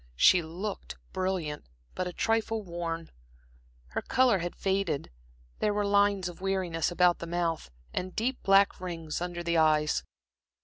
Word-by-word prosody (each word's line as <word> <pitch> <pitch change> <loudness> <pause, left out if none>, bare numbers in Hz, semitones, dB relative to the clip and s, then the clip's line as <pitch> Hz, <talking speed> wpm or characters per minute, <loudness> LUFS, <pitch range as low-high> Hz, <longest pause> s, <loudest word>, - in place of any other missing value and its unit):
She 175 - +6
looked 180 +6 -5 0.2
brilliant, 185 -6 -2 0.3
but 185 - -2
a - - -4
trifle 225 +2 0
worn; 170 -2 -4 0.8
her - - -2
color 250 -6 +3
had 175 +1 -4
faded, 190 - -1 0.5
there 210 -1 +1
were 205 0 +1
lines 200 -2 +3
of 175 0 -9
weariness 185 -4 0
about 175 0 +3
the 170 - -6
mouth, 170 - -1 0.2
and 185 0 -3
deep 250 +4 -1
black 195 0 +4
rings 165 -3 -4
under 175 -1 -3
the 170 0 +1
eyes. 155 -1 +3
180 Hz, 145 wpm, -29 LUFS, 165-195 Hz, 0.8 s, She